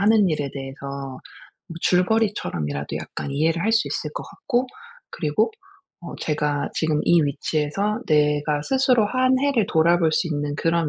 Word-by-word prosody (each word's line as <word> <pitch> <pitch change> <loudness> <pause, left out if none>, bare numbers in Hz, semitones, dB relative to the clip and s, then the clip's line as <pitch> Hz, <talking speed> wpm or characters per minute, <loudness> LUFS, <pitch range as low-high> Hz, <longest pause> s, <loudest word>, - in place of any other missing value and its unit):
하는 210 -1 +4
일에 145 -2 -2
대해서 135 0 -7 0.8
뭐 165 - -6
줄거리처럼이라도 180 - 0
약간 - - -6
이해를 160 +4 +1
할 220 - +1
수 225 - +3
있을 - - -3
것 - - -4
같고 260 -9 -2 0.4
그리고 155 +8 0 0.5
어 - - -8
제가 150 -2 -1
지금 155 -2 +1
이 170 -1 +5
위치에서 155 +8 -1
'내가 150 -1 +2
스스로 260 - +3
한 255 +3 +2
해를 275 -7 +2
돌아볼 165 0 +3
수 175 - +1
있는 145 -1 -2
그런 165 0 +1
165 Hz, 315 characters per minute, -23 LUFS, 145-215 Hz, 0.8 s, 이